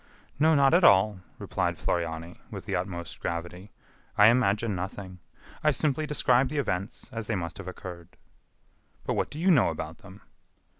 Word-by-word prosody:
"No, 160 +1 +5
not 140 +1 +4
at 175 +2 +5
all," 100 - +5 0.2
replied - - -2
Floriani, 85 0 -3
with - - -8
the - - -2
utmost 90 -2 -4
gravity, 85 +4 -5 0.5
"I 105 +1 +8
imagine 115 -2 +2
nothing. 95 0 -6 0.4
I 155 - +5
simply 150 +1 0
describe 130 -3 +2
the 150 - -4
events 100 -6 -3
as 115 -1 -4
they 110 - 0
must 85 -1 -5
have 95 - -8
occurred." 90 -2 -9 0.9
"But - - 0
what - - -1
do - - -9
you 180 +4 +3
know 140 - +5
about 80 0 -6
them?" 95 +1 -14
100 Hz, 165 wpm, -27 LUFS, 90-130 Hz, 0.9 s, I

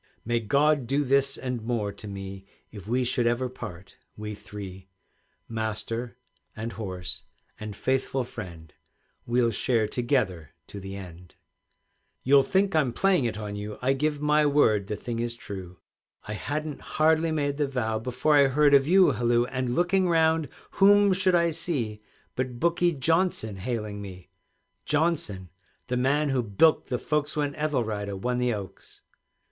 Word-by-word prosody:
"May 120 +1 +1
God 140 +4 +2
do 140 +3 +1
this 140 0 +2
and 125 -2 -4
more 110 -3 -1
to 105 - -10
me 95 -1 -7 0.3
If 100 -2 -10
we 125 +3 +1
should 125 -1 +1
ever 120 +2 +1
part, 90 -7 -9 0.2
we 105 0 -5
three, 95 -2 -9 0.6
Master 115 +2 -3 0.4
and 115 +2 -4
horse 90 -3 -6 0.4
and 105 -1 -6
faithful 130 +2 0
friend, 90 -10 -9 0.5
We'll 120 0 +2
share 110 0 +1
together 105 - -1
to 100 - -7
the 95 0 -7
end!" 90 -2 -11 0.9
You'll 140 +1 +6
think 190 +7 +1
I'm 140 -6 +2
playing 185 -6 +2
it 115 -3 -2
on 105 -1 -5
you, 105 +1 -6
I 135 +2 +3
give 150 +2 -1
my 150 +1 +3
word 125 -9 +3
the 105 - -2
thing 115 +2 -5
is 120 0 -2
true; 95 -5 -8 0.5
I 105 - -4
hadn't 150 +6 -4 0.2
hardly 160 +1 +3
made 145 -2 -1
the 145 -2 +1
vow, 110 -5 -1
Before 125 +6 +1
I 140 -1 +6
heard 145 +2 +4
a 140 - +9
view 180 +7 +5
halloo. 120 0 +2
And, 125 -1 -2
looking 180 +1 +2
round, 160 -3 +3 0.2
whom 205 0 +5
should 185 -1 +3
I 170 -1 +3
see, 120 -10 -3 0.3
But 125 -1 -3
Bookie 170 +1 +2
Johnson 160 - 0
hailing 105 -1 -4
me; 95 -3 -10 0.5
Johnson, 145 - 0 0.4
the 125 - 0
man 145 +4 +2
who 135 -2 +1
bilked 120 +9 +3
the 125 - 0
folks 150 +4 -1
When 145 -1 0
Ethelrida 110 -10 -2
won 125 +5 -1
the 125 0 +1
Oaks. 100 -3 -8
125 Hz, 160 wpm, -27 LUFS, 105-150 Hz, 0.9 s, a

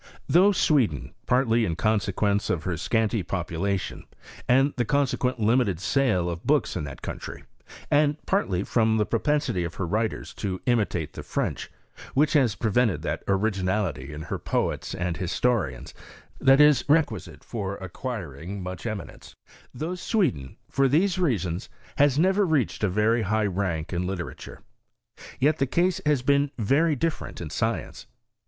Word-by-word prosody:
Though 190 +4 +5
Sweden, 125 - +1
partly 120 -2 +3
in 85 -6 -1
consequence 105 0 0
of 80 - 0
her 90 -2 -1
scanty 110 +5 0
population, 90 +2 -3 0.4
and 135 +3 +4
the 120 - +1
consequent 130 -1 0
limited 110 -5 +2
sale 105 -5 +1
of 85 -1 -4
books - - +1
in 75 - -2
that 70 - -9
country, - - -6 0.5
and 145 0 +3
partly 100 - 0
from 110 -1 +2
"the 105 - +2
pro 115 - 0
pensity 145 -12 0
of 85 0 -5
her 95 - -2
writers 110 +5 -2
to 95 -3 -3
imitate 100 - 0
the - - -7
French, - - -3 0.5
which 145 +2 +3
has 130 -8 +3
prevented 110 -7 +1
that 80 -2 -2
originality 95 -7 0
in 75 +1 -7
her - - -4
poets - - -2
and 90 -1 -2
his 90 -1 -3
torians 95 - 0 0.5
that 135 +1 +5
is 150 -4 +6
requisite 145 - 0
for 100 -4 -4
acquiring 95 - -6
much 90 +4 -5
eminence 110 -2 -7 0.2
— - - -25
though 165 +3 -2
Sweden, 175 - -1
for 135 0 +2
these 175 +7 +2
reasons, 100 - -1 0.3
has 145 -1 +4
never 190 +5 +3
reached 155 - 0
a 105 - +3
very 105 +5 +2
high 110 +1 +1
rank 95 -4 -2
in 90 +1 -1
literature; 90 -2 -6 0.8
yet 145 +3 +2
the 135 - +2
case 175 +6 +1
has 145 -4 +2
been 140 +1 +3
very 145 +8 +2
different 160 +4 -3
in 80 -4 -6
science. 115 0 -3
110 Hz, 155 wpm, -26 LUFS, 90-135 Hz, 0.8 s, is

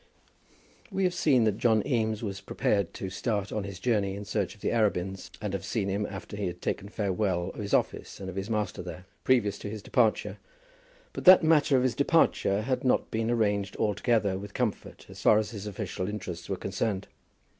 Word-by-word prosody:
We 195 -2 -1
have 180 -1 +2
seen 145 -9 +3
that 110 -1 +1
John 110 -3 +3
Eames 110 -5 0
was 95 -2 -4
prepared 100 -4 0
to 95 - -5
start 100 0 -2
on 105 -2 -2
his 100 -3 -7
journey 100 -3 +1
in 100 +1 -7
search 100 - -2
of 105 - -22
the - - 0
Arabins, 95 -5 0
and 105 -2 -4
have 100 - -3
seen 105 -4 -1
him 100 +2 -1
after 100 +1 -8
he 100 -2 -2
had 90 0 -5
taken 100 +2 -3
farewell 95 -3 -1
of - - -11
his 100 - -5
office - - -2
and 95 - -6
of 95 - -6
his 95 +2 -4
master 105 -4 -1
there, 90 +1 -8 0.2
previous 110 -6 +2
to 100 - -5
his 105 -1 -7
departure; 115 -4 +1 0.7
but - - -6
that 185 -1 +9
matter 150 -3 +4
of 125 - +2
his 130 -2 +2
departure 115 -7 +2
had 130 +2 -1
not 130 - +1
been 110 +1 -1
arranged 105 -4 +1
altogether 105 -2 +1
with 100 +1 -9
comfort 120 -5 -3
as - - -11
far 105 - +6
as 105 -1 -1
his 105 -2 -6
official 100 -2 -4
interests 90 -5 -6
were 95 - -1
concerned. 100 +1 -2
105 Hz, 205 wpm, -28 LUFS, 95-115 Hz, 0.7 s, that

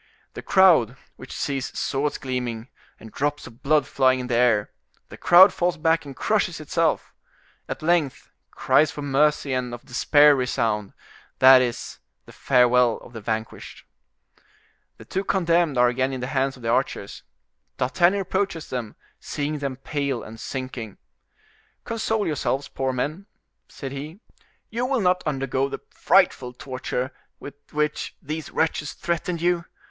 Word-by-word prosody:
The - - -7
crowd, 160 - +4 0.2
which 130 - -12
sees 135 -2 -3
swords 145 +1 -1
gleaming, 125 -2 -4 0.3
and 110 - -12
drops 145 +4 -2
of 115 - -14
blood 150 +1 +2
flying 130 -1 +2
in 125 - -4
the 125 - -3
air—the 115 -4 -1
crowd 185 +3 +7
falls 175 0 0
back 160 0 +1
and 140 -2 -9
crushes - - 0
itself. - - -1 0.6
At - - -5
length 165 -5 0 0.2
cries 155 - +2
for 145 - -7
mercy 145 0 +1
and 125 -1 -2
of 120 - -15
despair 145 +3 +5
resound; 115 -6 -1 0.4
that 130 0 +8
is, 120 -2 -4 0.3
the - - -14
farewell 125 -2 +3
of 120 - -14
the 115 - -7
vanquished. 110 +1 -5 1.1
The - - -13
two 190 - -3
condemned 170 -6 +1
are 125 0 +5
again 130 +2 -1
in 130 - -4
the - - -2
hands 135 0 0
of 125 - -15
the 115 - -2
archers. 120 -5 -1 0.6
D'Artagnan 175 +9 +2
approaches 190 -3 -2
them, 120 -4 -4 0.2
seeing 150 +1 -3
them 140 -2 -3
pale 140 -1 -3
and 115 +1 -11
sinking: 130 -5 -6 0.9
"Console 220 -2 -1
yourselves, 140 -2 -1
poor 135 -1 -2
men," 150 +10 -3 0.4
said 135 -2 -8
he, 150 +7 -7 0.5
"you 235 +2 -2
will 255 -1 0
not 180 -1 +2
undergo 135 -1 -1
the - - -4
frightful 125 0 +2
torture 130 0 -4 0.3
with 140 - -9 0.2
which 150 0 -2
these 155 +1 -6
wretches 155 -2 -1
threatened 170 0 -3
you. 175 -1 +1
135 Hz, 150 wpm, -24 LUFS, 125-160 Hz, 1.1 s, that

